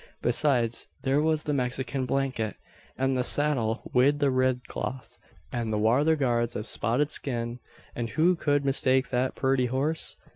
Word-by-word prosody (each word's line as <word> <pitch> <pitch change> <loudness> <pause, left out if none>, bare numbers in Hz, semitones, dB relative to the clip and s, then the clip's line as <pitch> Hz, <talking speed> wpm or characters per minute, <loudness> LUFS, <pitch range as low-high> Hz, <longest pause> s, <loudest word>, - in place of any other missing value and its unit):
Besides, 120 -2 +1 0.2
thare 135 +2 +2
was 155 -1 +1
the 150 - -1
Mexican 130 0 -2
blanket, 130 -5 -1 0.4
an 135 +1 +1
the 130 -1 +1
saddle 125 -5 +1
wid 135 +4 +4
the 140 -2 +2
rid 130 -2 +1
cloth, 125 -2 -5 0.4
and 120 -3 -2
the 105 - 0
wather 130 +9 +3
guards 120 -4 0
av 105 - -5
spotted 130 +6 0
skin; 120 -2 -3 0.4
and 115 -1 -3
who 165 +9 +3
could 145 -3 0
mistake 130 -1 +2
that 130 +1 0
purty 130 -2 +1
horse? 140 +6 -1
130 Hz, 155 wpm, -27 LUFS, 120-140 Hz, 0.4 s, wid